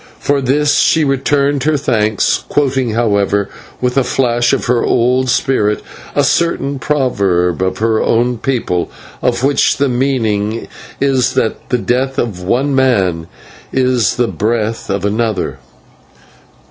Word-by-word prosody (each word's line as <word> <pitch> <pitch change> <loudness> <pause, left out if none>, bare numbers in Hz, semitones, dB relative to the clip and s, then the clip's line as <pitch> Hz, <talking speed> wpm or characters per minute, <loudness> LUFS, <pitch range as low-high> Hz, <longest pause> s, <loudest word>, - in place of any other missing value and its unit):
For 140 -1 0
this 145 +3 +2
she 160 - +3
returned 140 0 +1
her 155 -1 +2
thanks, 110 -7 0
quoting, 135 -5 0
however, 100 -3 +1 0.3
with 125 +1 -1
a - - +1
flash 120 -2 +1
of - - 0
her 120 -1 +1
old 125 +2 +1
spirit, 110 -5 +1 0.3
a - - +3
certain 140 -5 0
proverb 100 - 0
of 95 0 -1
her 110 0 +1
own 120 +1 +1
people, 115 -10 -1 0.3
of 125 0 0
which 140 +1 +2
the 140 0 +1
meaning 115 -4 -1 0.3
is 135 -3 +1
that 110 - -2
the 125 - +2
death 130 +3 -1
of 100 -6 -2
one 130 +10 0
man 95 -11 +1 0.4
is 125 -5 +1
the 120 -1 +1
breath 110 +1 -2
of 100 0 -1
another. 105 - -1
125 Hz, 135 wpm, -15 LUFS, 105-135 Hz, 0.4 s, she